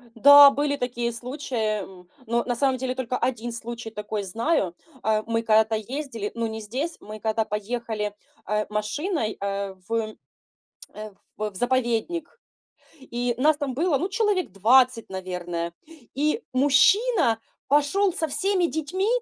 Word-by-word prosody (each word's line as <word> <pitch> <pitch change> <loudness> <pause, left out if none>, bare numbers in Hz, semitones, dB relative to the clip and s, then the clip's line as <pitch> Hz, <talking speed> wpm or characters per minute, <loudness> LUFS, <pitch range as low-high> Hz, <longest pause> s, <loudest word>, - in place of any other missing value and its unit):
Да, 285 +4 +10
были 285 0 0
такие 240 -2 -2
случаи, 235 -4 -2
м, 180 -2 -13 0.2
но, 235 +1 0
на 245 - -1
самом 265 +1 +1
деле, 255 0 -2
только 255 -1 -2
1 240 -2 -2
случай 235 -1 -6
такой 210 -1 -4
знаю. 220 - 0 0.3
А, 215 0 +1
мы 230 0 0
когда-то 220 0 +3
ездили, 230 -1 -4
ну, 230 0 -1
не 220 0 -5
здесь, 260 +11 -4
мы 215 +1 -9
когда 220 0 0
поехали, 210 -1 -3 0.3
э, 210 +1 0
машиной, 220 - -2
э, 200 -1 -3
в, - - -7 1.0
э, 215 -1 -8 0.2
в 215 0 -2
в - - -25
заповедник. 255 - -1 0.6
И 245 -2 -2
нас 300 +3 +4
там 280 -4 -3
было, 315 0 +1
ну, 370 - -1
человек 395 - 0
20, 240 +4 +4
наверное. 175 -2 -4 0.4
И 305 - 0
мужчина 285 - +4 0.3
пошел 295 +7 +3
со 320 -1 -2
всеми 375 +3 +1
детьми 335 +7 -2
235 Hz, 145 wpm, -25 LUFS, 215-285 Hz, 1.0 s, Да